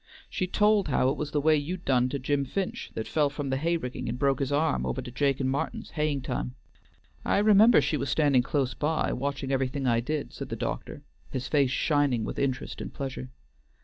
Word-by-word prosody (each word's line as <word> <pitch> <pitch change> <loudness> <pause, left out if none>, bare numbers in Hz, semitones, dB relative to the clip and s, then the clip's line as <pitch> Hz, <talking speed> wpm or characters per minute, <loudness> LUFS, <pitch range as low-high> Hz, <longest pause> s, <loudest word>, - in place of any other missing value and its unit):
She 185 - -1
told 210 0 +3
how 130 -2 +2
it 135 - 0
was 150 - -3
the 150 - 0
way 155 +2 +4
you'd 170 +5 -3
done 125 -1 +3
to 140 - -2
Jim 140 +1 0
Finch 185 +8 -3
that 110 - -3
fell 150 -2 +2
from 145 -1 -4
the 130 - +1
hay 170 +4 +1
rigging 125 -4 -5
and 120 - -3
broke 135 -1 +1
his 135 -1 -1
arm 145 - +1
over 65 -1 -2
to 125 - -6
Jake 140 +1 +1
an' 130 - 0
Martin's, 135 +2 -3
haying 150 -3 -1
time." 125 0 -4 0.7
"I - - +1
remember 210 +3 +6
she 155 - 0
was 135 0 -3
standing 140 -3 +3
close 130 0 -1
by, 155 +3 0
watching 135 0 -3
everything 135 +1 -1
I 120 -2 +3
did," 150 +5 -3
said - - -7
the - - -3
doctor, - - -5 0.3
his 130 - -4
face 140 -4 +3
shining 140 -4 +1
with - - -4
interest 130 -3 -2
and - - -6
pleasure. 130 -2 -5
140 Hz, 215 wpm, -28 LUFS, 130-150 Hz, 0.7 s, remember